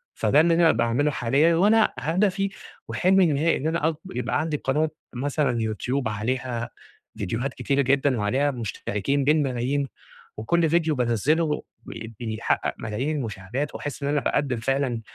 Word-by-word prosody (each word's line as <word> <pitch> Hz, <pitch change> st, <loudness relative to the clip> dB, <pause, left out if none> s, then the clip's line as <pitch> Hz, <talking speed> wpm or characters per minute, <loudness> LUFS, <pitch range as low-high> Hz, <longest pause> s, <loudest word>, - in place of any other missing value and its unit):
فده 150 Hz, -, +4 dB
اللي 165 Hz, +1 st, +3 dB
أنا 170 Hz, -1 st, +5 dB
باعمله 120 Hz, +6 st, +1 dB
حاليًا 140 Hz, +8 st, +2 dB
وأنا 215 Hz, +5 st, +4 dB
هدفي 195 Hz, +4 st, +1 dB, 0.4 s
وحلمي 190 Hz, 0 st, +4 dB
النهائي 155 Hz, +4 st, +2 dB
إن 150 Hz, -, -2 dB
أنا 160 Hz, -1 st, +1 dB
أك 160 Hz, -, -3 dB, 0.2 s
يبقى 125 Hz, -, 0 dB
عندي 155 Hz, -2 st, -1 dB
قناة 150 Hz, +4 st, 0 dB, 0.2 s
مثلًا 140 Hz, -1 st, 0 dB, 0.2 s
YouTube 125 Hz, +3 st, -2 dB
عليها 120 Hz, +2 st, -2 dB, 0.5 s
فيديوهات 115 Hz, +6 st, -2 dB
كتيرة 140 Hz, 0 st, 0 dB
جدًا 135 Hz, -1 st, +2 dB
وعليها 130 Hz, +8 st, +1 dB
مشتركين 120 Hz, +2 st, -2 dB
بالملايين 140 Hz, -2 st, +1 dB, 0.5 s
وكل 165 Hz, +9 st, +1 dB
فيديو 160 Hz, -2 st, +2 dB
بانزله 145 Hz, +7 st, +1 dB, 0.2 s
بي 115 Hz, 0 st, -8 dB
بيحقق 110 Hz, -2 st, -1 dB
ملايين 130 Hz, +9 st, -2 dB
المشاهدات 115 Hz, +4 st, -4 dB
وأحس 145 Hz, 0 st, -5 dB
إن 140 Hz, -, 0 dB
أنا 145 Hz, -, +2 dB
باقدم 135 Hz, -4 st, 0 dB
فعلًا 130 Hz, -1 st, -1 dB
140 Hz, 145 wpm, -25 LUFS, 120-155 Hz, 0.5 s, أنا